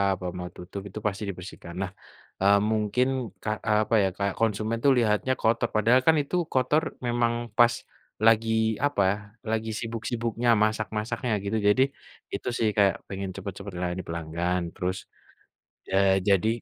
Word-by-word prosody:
apa 90 Hz, -, -9 dB
mau 90 Hz, 0 st, -5 dB
tutup 95 Hz, +2 st, -7 dB
itu 105 Hz, +2 st, -7 dB
pasti 105 Hz, +1 st, -3 dB
dibersihkan. 90 Hz, -2 st, -8 dB
Nah, 95 Hz, 0 st, -3 dB, 0.5 s
eee, 100 Hz, +1 st, +5 dB
mungkin 110 Hz, +4 st, +1 dB, 0.4 s
k -, -, -18 dB, 0.3 s
apa 110 Hz, +2 st, +2 dB
ya, -, -, +3 dB
kayak 100 Hz, -1 st, -1 dB
konsumen 110 Hz, 0 st, 0 dB
tuh 140 Hz, -, +6 dB
lihatnya 115 Hz, +2 st, +2 dB
kotor, 115 Hz, +1 st, +2 dB
padahal 115 Hz, +4 st, +4 dB
kan 160 Hz, -, +7 dB
itu 140 Hz, +5 st, -4 dB, 0.2 s
kotor 130 Hz, +4 st, +2 dB, 0.3 s
memang 120 Hz, 0 st, +1 dB, 0.2 s
pas 120 Hz, 0 st, +6 dB, 0.5 s
lagi 115 Hz, 0 st, +4 dB, 0.3 s
apa, 145 Hz, -9 st, +2 dB, 0.5 s
lagi 110 Hz, 0 st, -1 dB
sibuk-sibuknya, 115 Hz, +1 st, -2 dB
masak-masaknya 110 Hz, +2 st, -1 dB
gitu 105 Hz, +2 st, -1 dB
jadi 105 Hz, +6 st, +4 dB, 0.5 s
itu -, -, -4 dB
sih, 110 Hz, -, +2 dB
kayak 100 Hz, -1 st, +4 dB
pengen 95 Hz, -1 st, -4 dB
cepet-cepet 100 Hz, -1 st, -7 dB
layani 90 Hz, +1 st, -2 dB
pelanggan 85 Hz, +2 st, -2 dB
terus 90 Hz, +1 st, -2 dB, 0.9 s
ya 95 Hz, -, 0 dB, 0.3 s
jadi 100 Hz, +2 st, +4 dB
110 Hz, 145 wpm, -26 LUFS, 95-115 Hz, 0.9 s, kan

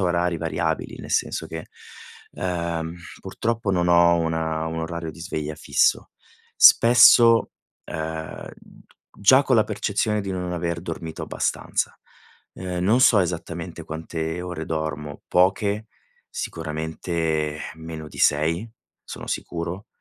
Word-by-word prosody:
a -, -, 0 dB
orari 90 Hz, -1 st, +1 dB
variabili, 80 Hz, -1 st, -2 dB
nel -, -, -9 dB
senso -, -, 0 dB
che, 80 Hz, -1 st, -7 dB, 0.6 s
uhm, 85 Hz, -2 st, -3 dB, 0.3 s
purtroppo 115 Hz, -2 st, -2 dB
non 90 Hz, -2 st, +1 dB
ho 85 Hz, 0 st, +5 dB
una 80 Hz, -1 st, -1 dB
un 80 Hz, 0 st, -3 dB
orario 80 Hz, 0 st, -4 dB
di 80 Hz, -, -14 dB
sveglia 75 Hz, -4 st, -4 dB
fisso. -, -, +1 dB, 0.5 s
Spesso, 115 Hz, -1 st, +7 dB, 0.3 s
uhm, 80 Hz, 0 st, -6 dB, 0.7 s
già 130 Hz, +7 st, +6 dB
con 130 Hz, -, +2 dB
la 110 Hz, -, +5 dB
percezione 105 Hz, 0 st, -1 dB
di 100 Hz, -1 st, -4 dB
non 90 Hz, -1 st, -3 dB
aver 85 Hz, -1 st, -2 dB
dormito 80 Hz, -2 st, -6 dB
abbastanza. -, -, -2 dB, 0.6 s
Uhm, 90 Hz, -1 st, -4 dB
non 110 Hz, +6 st, +4 dB
so 115 Hz, -5 st, +6 dB
esattamente 85 Hz, -1 st, -4 dB
quante 80 Hz, +1 st, -4 dB
ore 90 Hz, -3 st, -5 dB
dormo, 75 Hz, -2 st, -4 dB
poche, 100 Hz, +4 st, +2 dB, 0.4 s
sicuramente 80 Hz, -1 st, -3 dB
meno 80 Hz, -1 st, -8 dB
di -, -, -13 dB
6, 80 Hz, +8 st, +2 dB, 0.4 s
sono -, -, -8 dB
sicuro. 85 Hz, +4 st, -4 dB
85 Hz, 125 wpm, -23 LUFS, 80-95 Hz, 0.7 s, Spesso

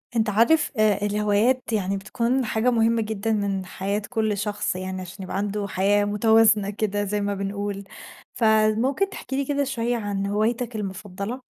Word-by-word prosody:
أنت 220 Hz, -1 st, +2 dB
عارف، 235 Hz, +10 st, +3 dB
آآ 210 Hz, -1 st, +3 dB
الهوايات 210 Hz, +4 st, +1 dB
يعني 195 Hz, -2 st, 0 dB
بتكون 235 Hz, +6 st, -1 dB
حاجة 225 Hz, +3 st, +1 dB
مهمّة 230 Hz, -1 st, +2 dB
جدًا 220 Hz, 0 st, -2 dB
من 200 Hz, -2 st, -1 dB
حياة 195 Hz, +3 st, -3 dB
كل 220 Hz, -3 st, 0 dB
شخص، 205 Hz, -2 st, -2 dB
يعني 185 Hz, 0 st, -4 dB
عشان 185 Hz, +2 st, -8 dB
يبقى 185 Hz, -, -4 dB
عنده 205 Hz, 0 st, -2 dB
حياة 200 Hz, +2 st, +2 dB
متوازنة 215 Hz, 0 st, +4 dB
كده 205 Hz, 0 st, -1 dB
زي 205 Hz, +1 st, -1 dB
ما 200 Hz, 0 st, -1 dB
بنقول، 200 Hz, 0 st, -4 dB, 0.5 s
فممكن 225 Hz, -, +2 dB
تحكي 265 Hz, -, -6 dB
لي 275 Hz, -, 0 dB
كده 285 Hz, +1 st, 0 dB
شويّة 245 Hz, -3 st, -1 dB
عن 205 Hz, -3 st, -2 dB
هوايتك 225 Hz, +3 st, -1 dB
المفضلة؟ 200 Hz, +3 st, -5 dB
210 Hz, 160 wpm, -24 LUFS, 200-230 Hz, 0.5 s, متوازنة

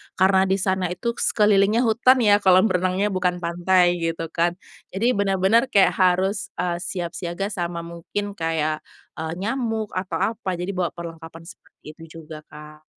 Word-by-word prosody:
karena 190 Hz, 0 st, +3 dB
di 190 Hz, -, +2 dB
sana 190 Hz, -1 st, -1 dB
itu 180 Hz, +7 st, -3 dB
sekelilingnya 210 Hz, 0 st, +2 dB
hutan, 245 Hz, +2 st, +3 dB
ya, 205 Hz, -1 st, +5 dB
kolam 185 Hz, +1 st, +4 dB
renangnya, 185 Hz, +3 st, 0 dB
bukan 180 Hz, -1 st, 0 dB
pantai 175 Hz, +1 st, +2 dB
gitu 165 Hz, -1 st, -3 dB
kan. 170 Hz, +1 st, 0 dB, 0.4 s
Jadi 235 Hz, +5 st, +2 dB
bener-bener 200 Hz, +3 st, +2 dB
kayak 200 Hz, -7 st, +4 dB
harus, 190 Hz, +2 st, +1 dB
eee, 175 Hz, -1 st, -2 dB
siap 175 Hz, -1 st, -5 dB
siaga 175 Hz, +3 st, -4 dB
sama 170 Hz, -3 st, -4 dB
mungkin 170 Hz, +5 st, -5 dB
kayak, 160 Hz, -4 st, -2 dB, 0.4 s
eee, 160 Hz, 0 st, -3 dB
nyamuk 225 Hz, +1 st, -3 dB
atau 185 Hz, +1 st, -3 dB
apa. 195 Hz, -5 st, -4 dB
Jadi 180 Hz, +3 st, -4 dB
bawa 185 Hz, -2 st, -1 dB
perlengkapan 165 Hz, -1 st, -9 dB
seperti 185 Hz, +5 st, -17 dB
itu 165 Hz, +1 st, -13 dB
juga, 155 Hz, 0 st, -9 dB
Kak. 150 Hz, 0 st, -13 dB
185 Hz, 155 wpm, -23 LUFS, 170-200 Hz, 0.4 s, ya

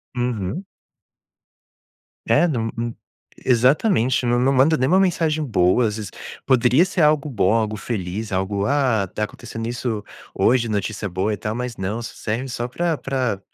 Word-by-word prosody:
Uhum. 120 Hz, -, -2 dB, 1.6 s
É, 175 Hz, -, +4 dB
num 115 Hz, -8 st, -1 dB
num 115 Hz, 0 st, -3 dB, 0.5 s
exatamente, 130 Hz, -, +3 dB
não 120 Hz, 0 st, +2 dB
não 130 Hz, +2 st, +3 dB
manda 140 Hz, +5 st, +4 dB
nem 130 Hz, +1 st, +1 dB
uma 185 Hz, +3 st, +4 dB
mensagem 160 Hz, -4 st, +1 dB
boa, 110 Hz, -2 st, +3 dB
às 105 Hz, -, -3 dB
vezes, 105 Hz, -3 st, -6 dB, 0.3 s
poderia 130 Hz, +3 st, +4 dB
ser 185 Hz, -2 st, -1 dB
algo 150 Hz, -1 st, +3 dB
bom, 105 Hz, -4 st, +2 dB
algo 110 Hz, -1 st, 0 dB
feliz, 105 Hz, -1 st, -4 dB
algo, 100 Hz, +2 st, -1 dB
"Ah, 130 Hz, -8 st, +1 dB
tá 105 Hz, -, -4 dB
acontecendo 115 Hz, +2 st, -7 dB
isso 120 Hz, -3 st, -3 dB, 0.3 s
hoje", 120 Hz, -1 st, +2 dB
notícia 105 Hz, 0 st, -2 dB
boa 95 Hz, +4 st, -1 dB
e 105 Hz, -, -3 dB
tal 105 Hz, +4 st, -3 dB
mas 125 Hz, 0 st, -4 dB
não, 100 Hz, +5 st, -3 dB
só 115 Hz, -, -7 dB
serve 115 Hz, +5 st, -3 dB
só 120 Hz, 0 st, -3 dB
pra 170 Hz, +4 st, -1 dB
pra 125 Hz, -5 st, -2 dB
120 Hz, 165 wpm, -22 LUFS, 105-135 Hz, 1.6 s, É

